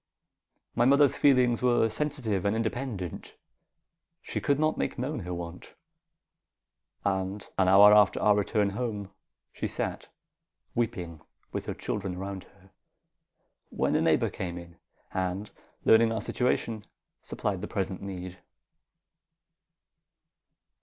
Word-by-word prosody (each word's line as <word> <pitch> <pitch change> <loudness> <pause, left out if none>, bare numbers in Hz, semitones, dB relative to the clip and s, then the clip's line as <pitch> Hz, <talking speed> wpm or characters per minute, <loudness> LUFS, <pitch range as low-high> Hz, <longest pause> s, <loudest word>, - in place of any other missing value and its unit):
My 120 - +2
mother's 140 +1 +5
feelings 125 -4 +4
were 120 -2 +3
sensitive 120 -7 -2
and 100 +2 +1
independent. 115 -5 -4 0.9
She - - -4
could 140 - +2
not 155 +1 +1
make - - -2
known 135 +4 -2
her 90 -3 -6
want. 85 0 -7 1.3
An 95 +1 -1 0.2
hour 95 +2 +8
after 105 -2 +5
our 105 -1 +4
return 105 0 +1
home, 105 -3 -4 0.4
she - - -3
sat - - -4 0.6
weeping 95 -9 -3 0.3
with - - -4
her - - -3
children 95 -3 -3
around 95 0 -6
her, 95 -1 -23 1.0
when - - 0
a - - +3
neighbour - - +2
came 90 -1 -5
in, 85 -1 -11 0.4
and, 95 +3 -2 0.3
learning 115 0 +6
our 115 - -1
situation, 115 -2 -1 0.4
supplied 95 -3 -3
the 105 - -4
present 95 -2 -3
need." 95 -2 -7
105 Hz, 120 wpm, -28 LUFS, 95-120 Hz, 1.3 s, hour